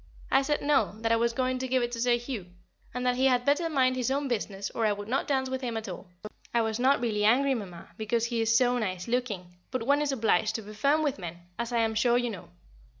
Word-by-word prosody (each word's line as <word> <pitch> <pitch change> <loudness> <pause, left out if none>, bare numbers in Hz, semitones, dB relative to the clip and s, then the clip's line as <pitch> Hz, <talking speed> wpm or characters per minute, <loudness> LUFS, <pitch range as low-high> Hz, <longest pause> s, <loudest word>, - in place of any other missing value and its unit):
I 270 - +5
said 295 +2 -1
No, 280 -7 +2
that 225 0 0
I - - +5
was 235 +1 +2
going 255 +1 -1
to 260 - -2
give 255 -1 +1
it 240 - -2
to 230 -1 -4
Sir 245 0 +4
Hugh, 235 -6 -6 0.4
and 250 +1 -4
that 250 0 +2
he 265 +1 +4
had 250 -1 +2
better 310 +4 +2
mind 260 -4 +2
his 255 -1 -1
own 280 +1 0
business 205 -5 -3
or 225 -1 0
I - - +2
would 205 0 -7
not 255 +4 -1
dance 265 -2 +1
with 260 0 -3
him 235 -3 -3
at 220 0 -5
all. 180 -1 -7 0.5
I 235 - +4
was 220 +1 -2
not 265 +3 +4
really 215 -3 0
angry, 265 +6 +4
Mamma 185 -9 -7
because 225 +1 0
he 235 -1 -1
is 225 0 +3
so 245 0 +3
nice 185 -3 -3
looking 220 -8 -2 0.2
but 255 -3 -2
one 285 +3 +3
is 295 -1 0
obliged 220 -4 +1
to 225 - -3
be 210 +1 -10
firm 280 +8 +2
with 285 -7 -1
men, 175 -1 -7 0.2
as 235 0 -2
I 235 -1 +2
am 225 -1 +1
sure 235 +2 +3
you 245 -1 0
know. 195 - -9
240 Hz, 270 wpm, -28 LUFS, 220-260 Hz, 0.5 s, I